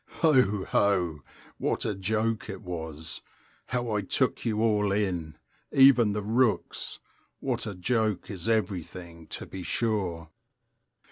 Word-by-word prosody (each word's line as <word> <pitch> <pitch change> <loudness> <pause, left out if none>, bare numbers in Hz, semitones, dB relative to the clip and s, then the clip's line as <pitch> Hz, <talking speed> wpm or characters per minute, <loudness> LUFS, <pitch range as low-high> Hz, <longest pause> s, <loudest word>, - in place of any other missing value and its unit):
Ho, 125 -11 +4
ho! 90 -6 +2 0.4
what - - 0
a 110 - 0
joke 110 +3 -1
it - - -6
was! 80 -3 -5 0.5
How 120 -2 -1
I 105 -1 +1
took 125 +7 0
you 110 -2 0
all 105 -3 +2
in! 90 -7 -1 0.3
Even 130 -6 +6
the 105 0 -2
rooks! 115 +2 0 0.4
What - - -1
a 100 - -4
joke 110 +2 0
is 100 +2 -4
everything, 90 -5 -2
to - - -6
be 95 - -7
sure! 90 -6 -1
105 Hz, 130 wpm, -28 LUFS, 90-110 Hz, 0.5 s, Even